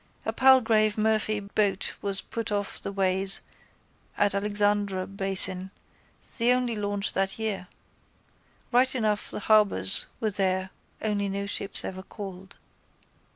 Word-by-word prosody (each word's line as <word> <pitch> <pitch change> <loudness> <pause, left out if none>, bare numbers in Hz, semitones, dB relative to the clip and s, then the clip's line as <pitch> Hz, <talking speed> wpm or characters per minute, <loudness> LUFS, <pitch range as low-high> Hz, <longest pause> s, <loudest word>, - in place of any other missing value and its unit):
A - - -2
Palgrave 225 -5 +4
Murphy 215 0 +1
boat 200 -1 -1
was 200 -1 -2
put 230 -2 -5
off 205 -1 -2
the - - -4
ways 195 0 +2 0.8
at 205 -1 +2
Alexandra 205 -1 0
basin, 195 -1 -1 0.7
the 235 +1 +4
only 250 -2 0
launch 205 -1 -1
that 195 0 -1
year. 215 -5 -3 1.0
Right 255 +2 +3
enough 215 -4 -1
the - - -6
harbours 200 - +5
were 220 -2 -1
there 190 -1 -1 0.3
only 205 -2 -1
no 200 +1 -3
ships 200 -1 -3
ever 190 0 -6
called. 190 -1 -10
205 Hz, 125 wpm, -27 LUFS, 195-215 Hz, 1.0 s, harbours